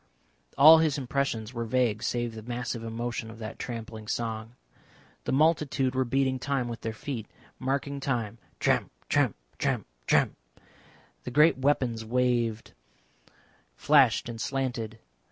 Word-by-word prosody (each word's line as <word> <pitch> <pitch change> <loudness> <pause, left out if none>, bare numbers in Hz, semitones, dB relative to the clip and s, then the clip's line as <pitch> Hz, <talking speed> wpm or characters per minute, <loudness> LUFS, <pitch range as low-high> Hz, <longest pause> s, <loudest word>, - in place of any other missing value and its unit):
All 155 +3 +10
his 155 -3 +2
impressions 130 -4 -2
were 115 -1 -3
vague 115 -2 +1
save 120 0 -1
the 110 - -8
massive 120 0 -4
emotion 115 0 -4
of 115 - -10
that 110 -1 -7
trampling 115 -2 -6
song. 115 0 -3 0.7
The - - -1
multitude 140 -3 +2
were 130 0 +1
beating 130 +1 +1
time 135 -1 -1
with 120 -1 -6
their 115 - -3
feet 110 0 -5 0.3
marking 140 +2 -2
time, 115 -5 -2 0.2
tramp, - - +2 0.2
tramp, - - +2 0.2
tramp, - - 0 0.2
tramp. - - +3 0.9
The - - -5
green 150 +1 +4
weapons 130 -5 +1
waved, 120 -1 0 1.0
flashed - - +4
and 115 -1 -6
slanted. 125 -5 -2
120 Hz, 135 wpm, -28 LUFS, 115-135 Hz, 1.0 s, All